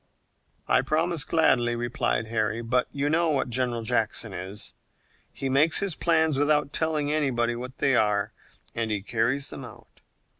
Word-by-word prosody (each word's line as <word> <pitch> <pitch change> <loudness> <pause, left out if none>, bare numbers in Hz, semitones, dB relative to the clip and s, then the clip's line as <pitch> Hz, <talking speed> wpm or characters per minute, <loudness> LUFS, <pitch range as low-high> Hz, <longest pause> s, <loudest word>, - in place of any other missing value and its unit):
"I - - +4
promise 160 0 0
gladly," 130 -7 +2
replied 120 -1 -1
Harry; 110 +1 -1
"but 125 +2 +1
you 140 0 -1
know 165 +2 +2
what 140 -4 0
General 120 -1 -1
Jackson 110 -2 -1
is. 95 +3 -5 0.6
He 135 - -4
makes 145 +5 +3
his 200 -3 0
plans 160 -4 +2
without 145 -1 +2
telling 155 -2 0
anybody 120 -6 +1
what 125 +2 -7
they 135 -2 +2
are, 105 -3 +1 0.4
and 115 -1 -2
he 105 -2 -2
carries 130 +6 0
them - - -7
out. - - -14
130 Hz, 155 wpm, -26 LUFS, 115-150 Hz, 0.6 s, I